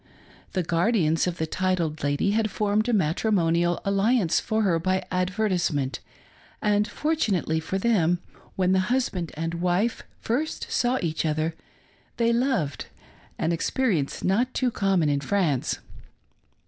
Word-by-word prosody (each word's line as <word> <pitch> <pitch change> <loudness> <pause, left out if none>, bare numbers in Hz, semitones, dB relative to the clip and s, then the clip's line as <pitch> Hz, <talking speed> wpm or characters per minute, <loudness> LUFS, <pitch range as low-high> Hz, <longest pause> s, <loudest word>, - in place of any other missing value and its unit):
The 185 - 0
guardians 170 -1 +2
of 175 -1 -2
the 160 - -1
titled 170 -2 -1
lady 145 +7 +1
had 220 +1 +1
formed 210 +3 0
a - - +3
mat 175 -8 +1
rimonial 175 -5 +2
alliance 200 -1 +2
for 220 0 0
her 175 -5 +2
by 185 +2 0
advertisement, 180 -7 0 0.6
and, 210 0 +2
fortunately 210 - 0
for 175 +4 -3
them, 190 -5 +2 0.4
when 185 -1 +2
the 190 - +4
husband 220 -10 -1
and 165 +2 -3
wife 180 +6 +1 0.2
first 280 +8 -2
saw 250 +1 +1
each 160 -2 -1
other, 155 +1 0 0.6
they 235 0 +2
loved 235 - 0 0.3
— - - -27
an 160 - 0
experience 170 - 0
not 235 +7 +1
too 255 -2 +1
commoji 190 -7 +1
in 140 -1 +1
France. 150 -3 0
185 Hz, 140 wpm, -25 LUFS, 165-220 Hz, 0.6 s, the